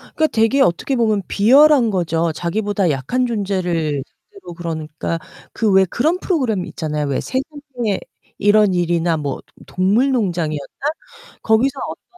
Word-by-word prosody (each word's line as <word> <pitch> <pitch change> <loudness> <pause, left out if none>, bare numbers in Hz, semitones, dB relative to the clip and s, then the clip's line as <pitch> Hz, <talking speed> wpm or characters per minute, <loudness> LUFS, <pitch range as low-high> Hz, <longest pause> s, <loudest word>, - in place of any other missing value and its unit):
그니까 315 - +3
되게 245 +1 +2
어떻게 175 +7 +1
보면 220 -4 +1
비열한거죠. 210 - +4
자기보다 200 +3 -1
약한 150 - -1
존재를 180 - -1 0.3
상대로 395 - -11
그러니까, 165 -1 -4 0.3
그 220 -2 +1
왜 190 0 +5
그런 310 - 0
프로그램 250 - -1
있잖아요. 150 -2 -3
왜 140 - -1
세상에 265 -5 -3 0.4
이런 205 -1 +4
일이나 170 -1 +1
뭐 145 -3 -3
도 - - -43 0.2
동물농장이었나? 185 - +1 0.8
거기서 230 +5 +2
어떤 - - -9
200 Hz, 325 characters per minute, -19 LUFS, 170-245 Hz, 0.8 s, 왜